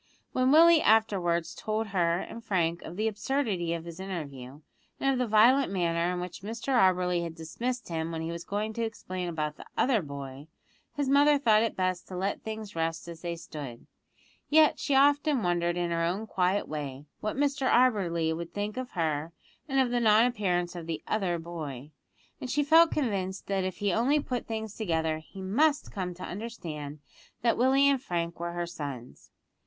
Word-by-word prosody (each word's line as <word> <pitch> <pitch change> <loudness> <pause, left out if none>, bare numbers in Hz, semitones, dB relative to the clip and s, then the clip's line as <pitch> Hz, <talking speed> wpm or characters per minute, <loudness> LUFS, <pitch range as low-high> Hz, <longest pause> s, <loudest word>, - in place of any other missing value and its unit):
When 255 +1 +2
Willie 330 +1 +7
afterwards 190 -6 +2
told 215 0 -3
her 170 -3 +2
and 230 - -8
Frank 170 -5 0
of 170 - -8
the 215 +3 0
absurdity 210 -6 -1
of 165 0 -7
his 170 0 -9
interview, 145 -8 -6 0.4
and 270 - +2
of 255 - -1
the 250 - +1
violent 235 +5 +5
manner 170 -2 +1
in 180 - -2
which 180 0 -6
Mr 225 +6 -3
Auberly 185 -5 +3
had 165 -1 -5
dismissed 240 +10 -4
him 165 0 -2
when 160 -1 -4
he 165 - -3
was 170 0 -6
going 210 +4 -3
to 230 - -2
explain 185 -5 -4
about 155 -2 -3
the - - -11
"other" 245 -5 +3
boy, 140 -1 -8 0.5
his 290 -2 -1
mother 285 +2 +5
thought 220 -6 +4
it 230 - 0
best 185 -1 -1
to 185 - -7
let 195 +2 -2
things 220 -1 -6
rest 165 0 -2
as 165 -1 -9
they 170 -1 -3
stood, 145 -7 -8 0.6
yet 310 0 +5
she 280 - 0
often 285 -1 +4
wondered 175 -1 +1
in 175 -1 -1
her 165 0 0
own 185 +6 -1
quiet 190 -1 0
way 145 -2 -5
what 215 - -3
Mr 280 -2 +1
Auberly 175 -10 +2
would 170 +1 -7
think 205 +2 -3
of 255 -1 -5
her 160 -2 -1 0.4
and 270 0 +2
of 255 -2 +2
the 245 - +2
non 220 0 +5
appearance 180 -7 0
of 170 -2 -7
the 165 -1 -4
"other" 190 -5 0
boy; 155 -5 -7 0.5
and 260 -3 -6
she 295 +3 +1
felt 325 +3 +6
convinced 195 -9 -2
that 195 -1 -1
if 185 -1 -3
he 205 -2 0
only 265 +8 +3
put 250 -4 -4
things 220 -2 -4
together 160 -6 -1
he 190 +4 -11
must 285 +10 +2
come 180 -3 -4
to 180 - -9
understand 165 -9 -6 0.5
that 235 - +3
Willie 270 +3 +4
and 275 -2 +3
Frank 170 -5 -3
were 170 0 -3
her 175 0 -2
sons. 140 -8 -8
185 Hz, 190 wpm, -29 LUFS, 170-235 Hz, 0.6 s, Willie